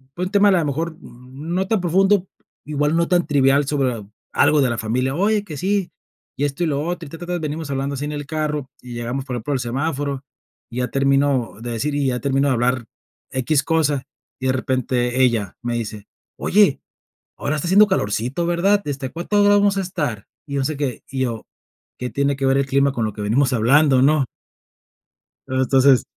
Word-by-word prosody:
Fue 180 Hz, -, -2 dB
un 185 Hz, -, -5 dB
tema 205 Hz, -1 st, +5 dB
a -, -, +5 dB
lo 175 Hz, -4 st, +2 dB
mejor 160 Hz, +3 st, -2 dB
no 145 Hz, +10 st, -5 dB
tan 220 Hz, -2 st, +1 dB
profundo, 190 Hz, +2 st, +3 dB, 0.4 s
igual 150 Hz, +1 st, 0 dB
no 170 Hz, 0 st, +2 dB
tan 175 Hz, -1 st, +2 dB
trivial, 140 Hz, -1 st, +3 dB
sobre 140 Hz, -4 st, +1 dB
a 110 Hz, -3 st, -8 dB, 0.3 s
algo 145 Hz, 0 st, +4 dB
de 130 Hz, -, +2 dB
la 120 Hz, -, -2 dB
familia: 125 Hz, +5 st, -1 dB
"Oye 205 Hz, +4 st, +2 dB
que 160 Hz, -7 st, -8 dB
sí. 195 Hz, +3 st, 0 dB, 0.5 s
Y 145 Hz, -, +1 dB
esto, 145 Hz, +4 st, -2 dB
y -, -, +1 dB
lo 145 Hz, -2 st, 0 dB
otro. 170 Hz, -1 st, -4 dB
Y -, -, -11 dB
ta, 165 Hz, -, -9 dB
ta, 175 Hz, -, -6 dB
ta". 180 Hz, 0 st, -2 dB
Venimos 155 Hz, -1 st, -4 dB
hablando 140 Hz, +1 st, -2 dB
así, 140 Hz, +2 st, -3 dB
en 150 Hz, -, -4 dB
el 145 Hz, -1 st, -5 dB
carro, 150 Hz, -3 st, -2 dB
y 125 Hz, -1 st, -9 dB
llegamos, 120 Hz, +3 st, -4 dB
por 125 Hz, -3 st, -4 dB
ejemplo, 120 Hz, +5 st, -3 dB
al 135 Hz, -, 0 dB
semáforo. 140 Hz, +2 st, -2 dB, 0.5 s
Y 120 Hz, -, -8 dB
ya 125 Hz, -1 st, -1 dB
termino 135 Hz, -2 st, +1 dB
de 120 Hz, -, -5 dB
decir, 130 Hz, +6 st, -2 dB
y 145 Hz, -1 st, +1 dB
ya 125 Hz, -1 st, 0 dB
termino 140 Hz, +1 st, +1 dB
de -, -, +3 dB
hablar 120 Hz, 0 st, 0 dB, 0.5 s
equis 135 Hz, +2 st, +1 dB
cosa. 150 Hz, -4 st, +1 dB, 0.4 s
Y 130 Hz, -, -5 dB
de 130 Hz, -, +2 dB
repente, 130 Hz, -1 st, 0 dB
ella 115 Hz, -6 st, 0 dB
me 120 Hz, 0 st, -2 dB
dice: 105 Hz, -3 st, -5 dB, 0.3 s
"Oye, 200 Hz, -7 st, +3 dB, 0.6 s
ahora 145 Hz, -, -1 dB
está 150 Hz, -, -3 dB
haciendo 205 Hz, +4 st, +6 dB
calorcito, 125 Hz, -, -1 dB
¿verdad? 185 Hz, +4 st, +2 dB
Este, 140 Hz, -2 st, -3 dB
¿A -, -, -9 dB
cuántos 190 Hz, +5 st, 0 dB
grados 205 Hz, 0 st, +5 dB
vamos 200 Hz, -1 st, +2 dB
a -, -, +1 dB
estar?", 150 Hz, -, -3 dB, 0.2 s
y 140 Hz, -, -4 dB
no 135 Hz, -, +1 dB
se 155 Hz, +1 st, -2 dB
qué. 135 Hz, -4 st, -3 dB
Y 135 Hz, -1 st, -3 dB
yo: 115 Hz, -4 st, -2 dB, 0.5 s
"¿Qué 125 Hz, -, -3 dB
tiene 140 Hz, +2 st, +1 dB
que 135 Hz, -, -1 dB
ver 135 Hz, 0 st, +3 dB
el 140 Hz, -, +2 dB
clima, 140 Hz, +1 st, +2 dB
con 115 Hz, -4 st, -1 dB
lo 110 Hz, -, -3 dB
que 105 Hz, -, -7 dB
venimos 130 Hz, +6 st, +2 dB
hablando?", 130 Hz, +3 st, +4 dB
¿no? 145 Hz, -2 st, +3 dB, 1.2 s
Eh, -, -, -5 dB
entonces 130 Hz, 0 st, +4 dB
140 Hz, 215 wpm, -21 LUFS, 130-165 Hz, 1.2 s, haciendo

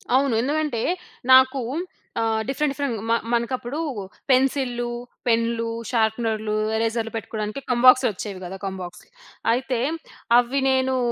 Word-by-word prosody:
అవును. 270 Hz, -1 st, +3 dB
ఎందుకంటే, 295 Hz, -3 st, -1 dB, 0.5 s
నాకూ 260 Hz, +1 st, +6 dB, 0.6 s
ఆహ్, 225 Hz, -1 st, +1 dB
డిఫరెంట్, 280 Hz, +2 st, 0 dB
డిఫరెంట్ 280 Hz, -5 st, -2 dB
మ -, -, +4 dB, 0.2 s
మనకప్పుడూ 240 Hz, +4 st, -1 dB, 0.5 s
పెన్సిల్లు, 255 Hz, -2 st, +2 dB, 0.4 s
పెన్‌లు, 230 Hz, 0 st, +1 dB, 0.2 s
షార్పెనర్‌లు, 220 Hz, -2 st, 0 dB, 0.2 s
ఎరేజర్‌లు 225 Hz, 0 st, -1 dB
పెట్టుకోవడానికి 215 Hz, +2 st, -4 dB
కంబాక్స్‌లు 255 Hz, +1 st, +6 dB
వచ్చేవి 190 Hz, 0 st, -6 dB
కదా! 190 Hz, +2 st, -6 dB
కంబాక్స్. 185 Hz, -2 st, -6 dB, 0.5 s
అయితే, 255 Hz, 0 st, -1 dB, 0.6 s
అవి 245 Hz, +3 st, 0 dB
నేనూ 260 Hz, 0 st, +2 dB
240 Hz, 110 wpm, -23 LUFS, 225-260 Hz, 0.6 s, నాకూ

